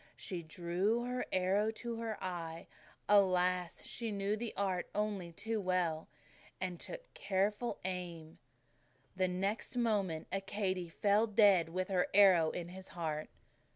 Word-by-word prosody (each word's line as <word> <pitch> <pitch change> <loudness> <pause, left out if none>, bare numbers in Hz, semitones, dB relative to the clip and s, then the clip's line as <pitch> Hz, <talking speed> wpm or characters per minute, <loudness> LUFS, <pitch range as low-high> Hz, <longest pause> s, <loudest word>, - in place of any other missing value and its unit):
She 180 -4 -5
drew 175 +8 0
her 250 +1 -2
arrow 190 +3 +2
to 235 0 -5
her 225 -2 -3
eye 170 -3 -4 0.4
alas, 180 -3 +3
she 230 -2 -4
knew 200 +1 0
the 225 +1 -4
art 190 -3 0
only 205 -4 -1
too 220 +5 -3
well! 180 -4 0 0.5
and 180 -2 -3
took - - -8
careful 205 +4 0
aim. 170 -4 -5 0.8
The 185 0 +2
next 195 +7 -2
moment 200 -9 0
Accadee 195 -2 -2
fell 205 +5 +3
dead 200 -6 +5
with 185 +3 -2
her 185 -2 +2
arrow 185 -6 +7
in 175 +1 -5
his 190 +1 -9
heart." 155 -3 -3
190 Hz, 135 wpm, -35 LUFS, 175-210 Hz, 0.8 s, arrow